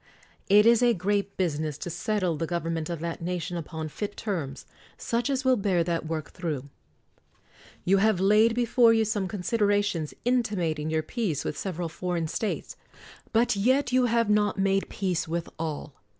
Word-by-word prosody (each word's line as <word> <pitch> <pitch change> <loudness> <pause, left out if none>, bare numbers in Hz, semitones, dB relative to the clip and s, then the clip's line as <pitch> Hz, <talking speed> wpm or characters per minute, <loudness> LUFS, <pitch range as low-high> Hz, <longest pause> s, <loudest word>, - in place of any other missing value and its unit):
It 205 +2 +7
is 235 0 +6
a 240 -2 +4
great 200 +2 -1
business 155 -5 -1
to 175 - -5
settle 185 -1 -1
the 165 +2 -3
government 165 -1 -2
of 170 -2 -4
that 170 0 -4
nation 175 0 -3
upon 160 -1 -5
fit 205 +7 -5
terms, 160 -11 -4 0.3
such 235 +2 -1
as 265 -1 -1
will 260 -1 +5
bear 195 -6 +1
that 165 -1 -2
work 155 -2 -4
through. 150 -6 -4 1.2
You 195 +2 +4
have 215 0 +3
had 190 - 0
laid 215 +3 +5
before 240 -1 +4
you 225 -1 +3
some 205 -3 -1
considerations 205 -4 0
intimating 180 -11 0
your 155 0 0
peace 200 - -2
with - - -2
sev 185 +1 -4
eral 170 -2 -3
foreign 170 -1 -2
states. 210 +6 -3 0.6
But 235 +1 +3
yet 255 +7 +2
you 255 0 +4
have 230 -1 +2
not 210 -1 +2
made 195 0 +1
peace 185 -5 -1
with 170 +1 -2
all. 155 -2 -4
190 Hz, 175 wpm, -27 LUFS, 165-220 Hz, 1.2 s, It